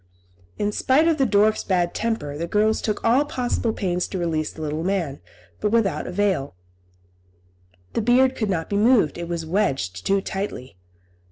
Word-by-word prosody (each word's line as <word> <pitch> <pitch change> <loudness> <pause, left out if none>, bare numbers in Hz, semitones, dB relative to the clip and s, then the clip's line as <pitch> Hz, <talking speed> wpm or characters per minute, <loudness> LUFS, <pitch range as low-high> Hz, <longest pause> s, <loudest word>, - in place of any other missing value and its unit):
In 205 0 0
spite 270 +9 +3
of 320 -2 +2
the 270 - +3
dwarf's 210 +1 +3
bad 175 -3 0
temper, 220 -11 -2
the 165 +3 -3
girls 215 +3 +2
took 215 -2 -2
all 245 +5 +4
possible 245 -5 -1
pains 180 -4 -1
to 190 - -5
release 165 -3 -1
the 160 - -8
little 155 +1 -3
man, 175 - -2 0.4
but - - 0
without 220 -4 +1
avail; 185 - -1 1.4
the - - 0
beard 255 +3 +3
could 215 -3 -2
not 165 -4 -1
be 200 - -1
moved, 210 - +3
it 170 - -4
was 170 -2 -3
wedged 135 - -1
too 195 0 +2
tightly. 190 - -5
200 Hz, 170 wpm, -23 LUFS, 165-225 Hz, 1.4 s, all